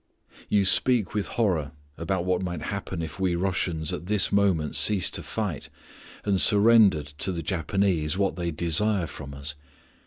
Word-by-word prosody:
You 100 -2 +2
speak 105 +3 +5
with 105 -2 -2
horror 85 - -1 0.2
about 85 +2 -3
what 90 0 0
might 90 -4 -5
happen 95 -4 -5
if 80 +3 -8
we 95 -2 0
Russians 85 -3 -2
at 85 - -6
this 105 -1 +1
moment 95 -7 +1
ceased 100 -5 +3
to - - -3
fight, 100 -10 -5 0.6
and 100 -3 +2
surrendered 100 -9 +4
to 95 - 0
the 85 -2 -5
Japanese 85 0 -1
what 100 -1 0
they 85 -1 -3
desire 85 +4 0
from 70 -3 -10
us. 70 +2 -6
90 Hz, 160 wpm, -25 LUFS, 80-100 Hz, 0.6 s, speak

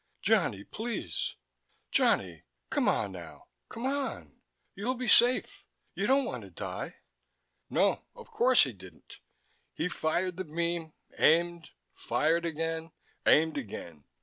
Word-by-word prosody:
"Johnny, 100 0 +2
please... 215 - -4 0.6
Johnny... 85 -5 +2 0.3
come - - +1
on, 100 - 0
now. 85 -3 -11 0.2
Come 230 +3 -6
on. 275 0 -3 0.3
You'll 240 +6 -2
be 250 0 -4
safe. 245 +2 +4 0.3
You - - -1
don't 270 0 +4
want 125 - -4
to 100 - -11
die...." 85 - -6 0.7
No, - - +2
of - - -13
course 255 +1 +5
he 130 - -2
didn't. 95 -4 -14 0.6
He 165 - -1
fired 175 +2 -1
the 185 - -2
beam, 170 0 -2 0.3
aimed, 170 +1 +3 0.2
fired 165 +2 +1
again, 165 0 -3 0.4
aimed 160 -1 +5
again. 85 - -8
165 Hz, 125 wpm, -30 LUFS, -, 0.7 s, course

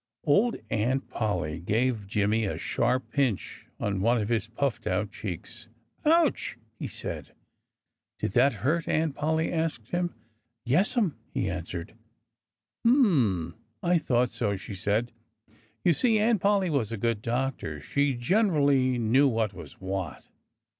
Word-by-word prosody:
Old 205 +11 +3 0.2
Aunt 125 +5 0
Polly 85 -8 -1
gave 110 +3 0
Jimmy 105 +2 +1
a 100 - -2
sharp 125 +2 0
pinch 130 -9 -1
on 100 -2 -1
one 120 +4 +3
of 105 0 -2
his 110 -3 0
puffed 120 +3 -2
out 100 +3 0
cheeks. 110 +4 -7 0.4
"Ouch!" 315 - +2 0.2
he - - -3
said. - - -7 0.8
"Did - - -2
that 125 +7 +4
hurt?" 165 +4 +1
Aunt 155 -2 +1
Polly 160 +3 0
asked 160 -9 -2
him. 175 0 -1 0.5
"Yessum!" 180 - +2
he 95 - -1
answered. 90 0 -5 0.9
"Hm 135 - +3 0.3
I 175 0 +3
thought 125 -4 +1
so!" 100 -1 -1
she 95 +2 -8
said. 105 +5 0 0.7
You 175 - +5
see, 225 - +3
Aunt 215 -2 +2
Polly 200 -3 +2
was 120 -7 0
a 115 - -3
good 115 0 0
doctor. 120 - -2
She 140 - 0
generally 140 - +3
knew 120 +5 +4
what 110 -4 0
was - - -10
what. 95 -4 -4
120 Hz, 140 wpm, -28 LUFS, 105-160 Hz, 0.9 s, You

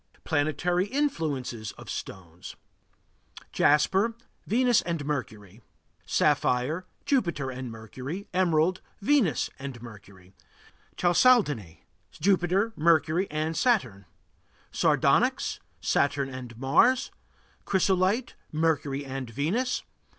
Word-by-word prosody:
PLANETARY 160 +5 0
INFLUENCES 150 - -2
OF - - -13
STONES 85 -2 -8 1.0
Jasper 190 +10 +3 0.3
Venus 245 +1 +3
and 165 -4 -3
Mercury. 110 -7 -5 0.5
Sapphire 150 +9 +1 0.2
Jupiter 170 - 0
and 130 -1 -6
Mercury. 130 - -7
Emerald 180 0 +2 0.2
Venus 225 - +2
and 135 -3 -7
Mercury. 100 -5 -14 0.6
Chalcedony 175 - +3 0.3
Jupiter, 195 +3 +1
Mercury, 165 +3 +2
and 155 +2 -2
Saturn. 125 - +1 0.7
Sardonyx - - +2 0.2
Saturn 140 -1 +1
and 125 -3 -8
Mars. 170 - +3 0.5
Chrysolite 190 +4 +1 0.2
Mercury 150 -3 0
and 135 -2 -5
Venus. 185 - -1
155 Hz, 85 wpm, -27 LUFS, 130-190 Hz, 1.0 s, Jasper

